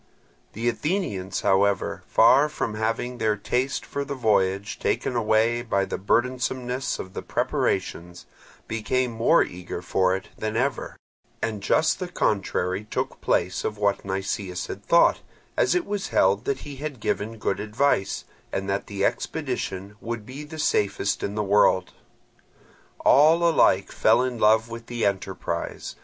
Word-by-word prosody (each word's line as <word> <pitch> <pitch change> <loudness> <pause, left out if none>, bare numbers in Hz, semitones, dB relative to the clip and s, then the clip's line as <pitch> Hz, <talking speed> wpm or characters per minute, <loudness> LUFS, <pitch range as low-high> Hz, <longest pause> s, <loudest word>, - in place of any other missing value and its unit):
The 115 +3 -3
Athenians, 120 - -1
however, 100 0 +2
far 135 +6 +5
from 115 -7 -3
having 115 +3 -2
their 110 -1 +2
taste 125 +6 -1
for 140 - -3
the 140 0 -5
voyage 100 -4 +1
taken 125 - -1
away 115 +1 +2
by 100 -5 0
the - - -4
burdensomeness 125 +4 0
of 95 - -8
the - - -4
preparations, 85 +1 -2 0.4
became 125 +3 -1
more 115 +8 +4
eager 90 0 -7
for 95 +1 +2
it 95 - -7
than 110 +1 -3
ever; 135 +4 -2 0.4
and 110 -3 -3
just 155 - +2
the 185 - -3
contrary 100 - -1
took - - -3
place 90 +2 0
of 105 - -3
what 100 -1 +1
Nicias 95 -1 -3
had 100 - -7
thought, 170 - +4 0.4
as - - +2
it 360 -2 +1
was 205 -1 -3
held 100 +4 +2
that 135 -1 -1
he 145 -2 -8
had 145 -3 -5
given 110 +2 -2
good - - -1
advice, 110 0 0 0.3
and 95 0 -3
that 100 0 -2
the 100 -1 -1
expedition 100 +2 -3
would 115 -2 -5
be 135 +6 -8
the 150 +1 -9
safest 100 -8 0
in 100 - -3
the 105 - 0
world. 95 -2 +3 1.1
All 160 +4 +6
alike 165 - +3
fell 125 - +3
in 125 -2 -3
love 110 +1 +4
with 115 0 -8
the 120 -2 -2
enterprise. 95 -3 -3
110 Hz, 150 wpm, -25 LUFS, 100-130 Hz, 1.1 s, All